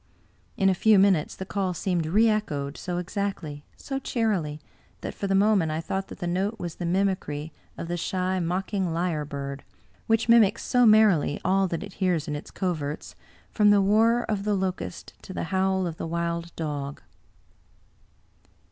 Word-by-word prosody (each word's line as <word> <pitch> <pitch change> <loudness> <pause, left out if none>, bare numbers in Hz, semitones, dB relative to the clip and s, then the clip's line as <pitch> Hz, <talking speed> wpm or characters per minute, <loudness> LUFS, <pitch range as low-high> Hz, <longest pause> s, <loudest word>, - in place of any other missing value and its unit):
In 195 - +3
a 190 - +5
few 215 +3 +4
minutes 190 -5 +3
the 190 - -6
call 190 -2 -2
seemed 175 -2 -1
reechoed, 195 -8 +1
so 180 -1 -4
exactly, 180 -5 -4
so 270 -1 -4
cheerily, 200 - -1 0.4
that - - -5
for 200 - -4
the 195 - +2
moment 195 -5 +3
I 155 - -2
thought 190 +4 -3
that - - -10
the 180 - -5
note 190 +5 -1
was 175 -5 -6
the 175 - -3
mimicry 170 -5 -1 0.2
of 165 - -5
the 175 +1 -2
shy 185 +2 -1
mocking 185 +1 -1
lyre 165 -3 -1
bird, 140 -1 -6 0.4
which 225 +1 +2
mimics 230 -2 +5
so 245 -2 +4
merrily 215 -9 +4
all 190 +1 +3
that 170 -2 -3
it - - -9
hears 175 -5 +1
in 150 - -2
its 145 - -7
coverts, 155 -6 -3 0.4
from 210 -2 +4
the 205 0 +6
whir 225 +4 +3
of 205 -2 -2
the 210 0 +1
locust 190 -1 -4
to 190 - -9
the - - -3
howl 190 0 +2
of 165 -2 -4
the - - -4
wild 170 0 -2
dog. 145 -3 -4
185 Hz, 175 wpm, -26 LUFS, 165-200 Hz, 0.4 s, the